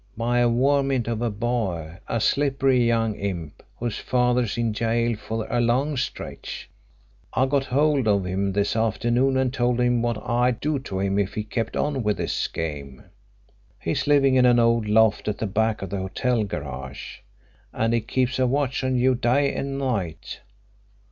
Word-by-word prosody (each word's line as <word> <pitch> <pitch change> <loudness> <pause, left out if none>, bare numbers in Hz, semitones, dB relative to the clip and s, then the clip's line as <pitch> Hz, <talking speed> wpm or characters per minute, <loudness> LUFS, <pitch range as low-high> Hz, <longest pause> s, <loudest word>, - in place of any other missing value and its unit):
"By 120 +2 +1
a 120 0 +4
varmint 135 0 +2
of 115 -1 -2
a 120 - +1
boy 100 -7 -3
a 115 - -1
slippery 135 0 +2
young 115 -2 +1
imp 90 -7 -5 0.2
whose 120 -2 -3
father's 125 -2 +1
in 115 -1 0
gaol 115 +2 0
for 110 +1 -4
a 120 0 0
long 130 +6 +1
stretch. 130 - -5 0.7
I 130 - +3
got 135 0 0
hold 140 -1 +2
of 100 -3 +2
him 95 +2 -1
this 100 +2 0
afternoon 120 +4 +1
and 130 -1 +1
told 125 -1 +1
him 120 -1 +2
what 120 -1 0
I'd 120 0 +1
do 150 -1 -1
to 95 -8 -5
him 100 +1 0
if 100 -1 -1
he 105 - -2
kept 115 +2 -3
on 145 -3 0
with 105 -2 0
his - - -2
game. 70 -5 -5 0.8
He's 85 - -2
living 140 -2 +4
in 125 -1 +5
an 120 -1 +5
old 115 -2 +3
loft 110 0 +3
at 105 -1 -1
the 110 - -2
back 110 +1 0
of 95 - -6
the 100 - -2
hotel 110 +5 0
garage, 70 -7 -7 0.5
and 115 +1 0
he 115 - +2
keeps 130 +3 -1
a 130 - +3
watch 135 0 0
on 130 0 0
you 130 +1 +3
day 130 +4 +1
and 135 0 -3
night. 100 - -3
120 Hz, 180 wpm, -24 LUFS, 105-130 Hz, 0.8 s, in